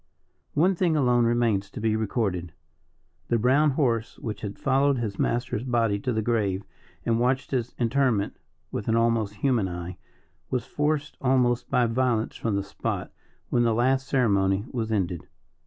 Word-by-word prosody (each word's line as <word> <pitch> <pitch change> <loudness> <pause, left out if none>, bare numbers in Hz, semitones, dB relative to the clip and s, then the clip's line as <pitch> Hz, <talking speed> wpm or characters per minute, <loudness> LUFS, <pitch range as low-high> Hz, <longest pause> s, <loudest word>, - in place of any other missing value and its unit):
One 175 +6 +4
thing 175 -3 +1
alone 125 -4 +3
remains 115 -4 +1
to 120 - -8
be 110 0 +1
recorded. 100 -6 -1 0.7
The 120 - +2
brown 135 +7 +4
horse, 120 -5 0
which 105 -3 -5
had 100 -2 -5
followed 135 +1 +2
his 110 -5 -3
master's 120 -1 0
body 115 -5 +1
to 125 - -2
the 110 -2 0
grave, 105 -4 0 0.4
and 115 0 +2
watched 130 +2 0
his 125 -3 -2
interment 120 -3 +1 0.3
with 105 - -4
an 115 - +2
almost 115 -3 +1
human 120 -5 +1
eye, 90 +1 -6 0.5
was 125 -2 -1
forced 150 0 -1
almost 125 -2 +2
by 125 - +3
violence 115 -1 0
from 110 -3 -1
the 100 - 0
spot 100 - -4 0.4
when 120 - +2
the 115 -2 +2
last 130 +3 +2
ceremony 100 -6 +2
was 115 -3 -2
ended. 90 -5 -1
115 Hz, 160 wpm, -26 LUFS, 105-130 Hz, 0.7 s, One